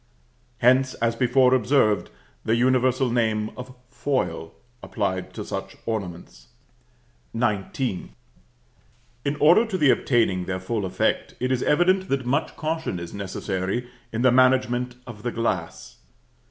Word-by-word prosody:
Hence, 130 +2 +3
as 115 0 0
before 125 +1 +3
observed, 125 -4 +2 0.3
the 110 - +1
universal 130 +1 +2
name 110 -3 0
of 130 0 -9 0.2
foil 90 - -2 0.3
applied 95 -4 -3
to - - -5
such - - -6
ornaments. 90 - -5 0.9
XIX. 105 -1 -1 1.1
In 140 +1 -1
order 175 +9 +6
to 195 -4 -2
the 145 -6 +5
obtaining 105 -8 +1
their 95 0 -3
full 100 +2 -2
effect, 95 - -1
it 125 +1 -1
is 130 -1 +1
evident 185 +4 +2
that 135 -2 -1
much 140 +6 -1
caution 160 - -3
is 85 0 -8
necessary 100 +3 -3 0.2
in 115 +2 -2
the 130 - +6
management 125 -1 +3
of 115 -4 -10
the 120 +1 -2
glass. 85 - -3
120 Hz, 130 wpm, -24 LUFS, 100-130 Hz, 1.1 s, order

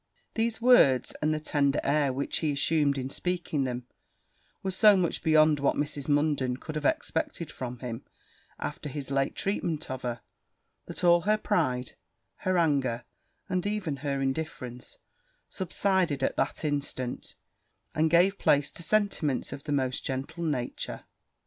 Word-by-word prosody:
These 225 0 0
words, 140 - +5
and 155 +1 +2
the 155 - 0
tender 145 -2 +1
air 140 -1 +2
which 135 +2 -2
he 155 -3 0
assumed 140 0 +2
in 130 0 -3
speaking 170 -6 -1
them, 125 -1 -4 0.8
were 190 - -1
so 205 +2 +6
much 175 -3 0
beyond 155 -1 +5
what 140 - +2
Mrs. 145 -1 -3
Munden 145 -4 +2
could 155 - -7
have 150 -1 -3
expected 160 0 -1
from 125 -1 -6
him, 120 -2 -6 0.5
after 150 - -5
his 140 0 -5
late 135 0 +1
treatment 165 -7 -2
of 130 -1 -4
her, 120 -1 -3 0.7
that - - -5
all 175 -1 +6
her 210 +4 +2
pride, 145 - 0 0.5
her 185 -1 0
anger, 135 -8 +1 0.4
and 185 +1 -1
even 195 -9 -2
her 140 0 -2
indifference, 135 -3 -4 0.5
subsided 185 -5 0
at - - +1
that - - -1
instant, 140 -4 -3 0.6
and 160 +1 +2
gave 180 +4 +4
place 145 0 +3
to - - -9
sentiments 170 -8 0
of 140 0 -9
the 150 - -3
most 130 -3 0
gentle 140 +6 -4
nature. 130 -7 -3
150 Hz, 150 wpm, -28 LUFS, 135-170 Hz, 0.8 s, so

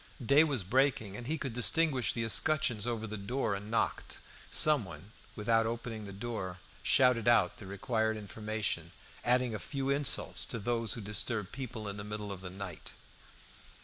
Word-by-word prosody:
Day 140 +6 +7
was 140 -9 0
breaking, 115 -1 +2
and 120 +2 -6
he 160 +3 0
could 135 -6 -4
distinguish 130 +2 +3
the 115 - -1
escutcheons 120 -2 +1
over 115 -2 -2
the 110 0 -5
door, 115 +2 -1
and 100 +2 -5
knocked. 115 - 0 0.3
Someone, 100 - +1 0.2
without 115 +1 +2
opening 115 -2 -4
the 100 - -7
door, 100 -3 -4 0.2
shouted 125 -4 +4
out 110 -7 +4
the 100 - -9
required 110 +3 0
information, 105 -4 -2 0.3
adding 125 -1 +2
a 105 - -3
few 135 -1 -2
insults 140 0 +1
to 115 - -3
those 115 +1 0
who 120 - -4
disturb 105 0 -1
people 120 -5 -5
in 100 0 -4
the 100 - -5
middle 105 0 -5
of 95 -2 -6
the 95 - -6
night. 95 -2 -7
110 Hz, 170 wpm, -32 LUFS, 100-125 Hz, 0.3 s, Day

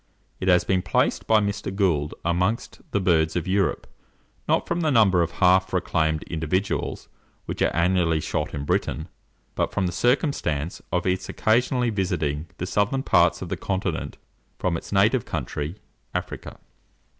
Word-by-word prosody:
It 95 - -3
has 90 -1 +5
been 95 -1 +1
placed 90 - 0
by 110 -1 +5
Mr. 100 -1 -2
Gould 85 -7 0
amongst 90 +6 -1
the 100 - 0
birds 80 -4 +2
of 85 +1 -1
Europe; 95 0 +1 0.6
not - - +1
from 170 0 -1
the 155 - +2
number 105 -9 +4
of 85 -1 -1
half 95 +1 +3
reclaimed 80 -4 0
individuals 85 +5 -2 0.4
which - - -5
are - - +4
annually 85 -1 +2
shot - - -2
in 70 0 -4
Britain, 80 +3 -1 0.4
but - - -1
from 95 - 0
the 90 - -1
circumstance 90 - 0
of 90 -1 0
its 95 0 -1
occasionally 125 +2 +2
visiting 85 -6 -1
the 90 - -3
southern 105 +8 0
parts - - +3
of - - -7
the - - -2
continent 95 -4 -3 0.4
from 90 -2 0
its - - -7
native 105 +5 +3
country, 75 +2 -4 0.4
Africa. - - -5
90 Hz, 155 wpm, -24 LUFS, 80-100 Hz, 0.6 s, has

